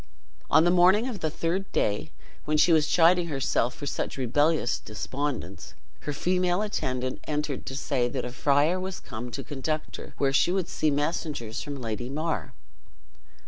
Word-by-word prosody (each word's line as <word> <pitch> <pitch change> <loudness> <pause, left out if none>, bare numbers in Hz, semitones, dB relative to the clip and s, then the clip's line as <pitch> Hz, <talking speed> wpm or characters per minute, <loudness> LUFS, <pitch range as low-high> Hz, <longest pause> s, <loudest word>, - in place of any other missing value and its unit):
On 160 - +6
the 175 - +4
morning 185 +6 +5
of 235 -6 -4
the 155 - -1
third 170 +5 -2
day, 105 0 0 0.4
when 155 0 +1
she 170 +2 +5
was 155 -2 +4
chiding 175 +1 +4
herself 135 -4 0
for 145 - -7
such 140 - -3
rebellious 145 +2 +2
despondence, 110 - -5 0.2
her 150 - -4
female 180 +5 +1
attendant 130 -11 -2
entered 150 -2 -3
to 135 - -4
say, 135 -3 0
that - - -3
a 125 - -5
friar 145 +7 +2
was 185 0 -4
come 120 0 -7
to 120 +4 -5
conduct 150 +4 -3
her - - -10
where 135 -1 +1
she 170 - +4
would 190 -1 0
see 155 - +1
messengers 145 -5 -2
from 145 -2 -5
Lady 120 +1 -4
mar. 150 - -3
145 Hz, 170 wpm, -27 LUFS, 130-170 Hz, 0.4 s, On